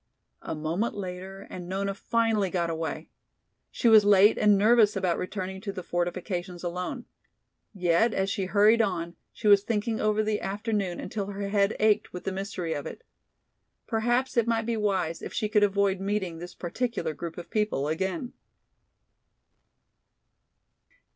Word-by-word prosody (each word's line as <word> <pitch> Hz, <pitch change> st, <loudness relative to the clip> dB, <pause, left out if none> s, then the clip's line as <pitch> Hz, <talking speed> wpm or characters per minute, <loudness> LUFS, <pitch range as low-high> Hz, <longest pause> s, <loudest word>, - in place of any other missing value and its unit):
A -, -, -5 dB
moment 165 Hz, +9 st, -2 dB
later 190 Hz, 0 st, -7 dB
and 180 Hz, -1 st, -7 dB
Nona 195 Hz, +1 st, -1 dB
finally 225 Hz, -2 st, +1 dB
got 170 Hz, -2 st, -1 dB
away. 160 Hz, 0 st, -4 dB, 0.6 s
She 240 Hz, -, 0 dB
was 220 Hz, -2 st, +8 dB
late 205 Hz, +1 st, +6 dB
and 210 Hz, -1 st, +4 dB
nervous 215 Hz, +1 st, +5 dB
about 185 Hz, -3 st, 0 dB
returning 190 Hz, 0 st, -4 dB
to 200 Hz, -1 st, -4 dB
the 185 Hz, -2 st, -7 dB
fortifications 175 Hz, +1 st, -3 dB
alone. 180 Hz, +9 st, -4 dB, 0.7 s
Yet 185 Hz, +3 st, +2 dB
as 195 Hz, -2 st, 0 dB
she 195 Hz, -1 st, -1 dB
hurried 210 Hz, +4 st, +4 dB
on 175 Hz, -5 st, -2 dB, 0.2 s
she 215 Hz, -, -4 dB
was 200 Hz, -1 st, +7 dB
thinking 220 Hz, +1 st, -1 dB
over 215 Hz, 0 st, +2 dB
the 215 Hz, -1 st, -1 dB
afternoon 200 Hz, -2 st, -2 dB
until 200 Hz, +1 st, -4 dB
her 200 Hz, 0 st, -4 dB
head 200 Hz, 0 st, +2 dB
ached 215 Hz, -1 st, +2 dB
with 180 Hz, -, -6 dB
the 195 Hz, -, -2 dB
mystery 190 Hz, -3 st, -3 dB
of 145 Hz, -, -4 dB
it. -, -, -9 dB, 0.8 s
Perhaps 240 Hz, +3 st, 0 dB
it 235 Hz, -1 st, +3 dB
might 225 Hz, -1 st, +1 dB
be 235 Hz, 0 st, -1 dB
wise 190 Hz, -6 st, -1 dB
if -, -, -7 dB
she 215 Hz, -, -1 dB
could 210 Hz, 0 st, +2 dB
avoid 200 Hz, -1 st, +2 dB
meeting 195 Hz, -4 st, -2 dB
this 175 Hz, +1 st, -9 dB
particular 230 Hz, -1 st, -3 dB
group 165 Hz, +1 st, -7 dB
of 175 Hz, -, -9 dB
people 210 Hz, -10 st, 0 dB
again. 185 Hz, +7 st, -2 dB
195 Hz, 155 wpm, -27 LUFS, 180-215 Hz, 0.8 s, was